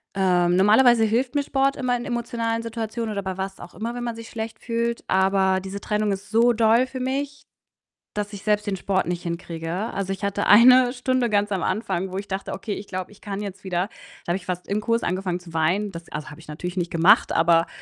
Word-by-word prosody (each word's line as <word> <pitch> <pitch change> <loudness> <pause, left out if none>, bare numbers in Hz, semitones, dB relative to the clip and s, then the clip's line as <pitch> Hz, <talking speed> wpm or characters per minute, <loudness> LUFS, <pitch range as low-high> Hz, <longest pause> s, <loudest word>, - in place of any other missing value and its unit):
Ähm, 180 -2 +3
normalerweise 225 +4 +5
hilft 245 +5 0
mir 285 - +2
Sport 275 0 +1
immer 250 -2 0
in 240 - -5
emotionalen 230 -2 -2
Situationen 225 -1 -4
oder 200 - -3
bei 190 -1 -4
was 195 0 -5
auch 175 - -11
immer, 230 +2 -4
wenn 245 0 -4
man 235 -1 -3
sich 230 0 -9
schlecht 220 -1 -6
fühlt, 235 0 -2
aber 190 0 +2
diese 195 +1 -6
Trennung 210 -1 0
ist 195 +2 -6
so 230 +2 +4
doll 230 +3 +4
für 260 0 -7
mich, 280 +2 -3 0.7
dass 210 0 -4
ich 200 - -8
selbst 210 0 +1
den 200 -2 -1
Sport 190 0 0
nicht 175 +1 -3
hinkriege. 170 -1 -5 0.2
Also, 195 -1 -2
ich 195 +2 -5
hatte 200 0 -1
eine 250 +3 +7
Stunde 255 -1 0
ganz 205 0 +1
am 190 - 0
Anfang, 190 -2 -2
wo 190 - -4
ich 200 - -5
dachte: 190 0 -4
„Okay, 200 +2 -4
ich 200 - -7
glaube, 185 0 -5
ich 205 - -18
kann 200 -1 -5
jetzt 200 -2 -7
wieder.“ 180 0 -1 0.4
Da - - -1
habe 175 - +1
ich 185 - -12
fast 180 -1 -4
im 205 +2 -1
Kurs 230 +1 0
angefangen 180 -1 -1
zu 175 -2 -14
weinen. 180 +6 +1
Das 170 0 -10
also, 150 0 -5
habe 150 - -11
ich 160 - -15
natürlich 175 +4 -6
nicht 175 -1 -1
gemacht, 165 +3 +5
aber 165 0 +3
205 Hz, 230 wpm, -24 LUFS, 185-230 Hz, 0.7 s, eine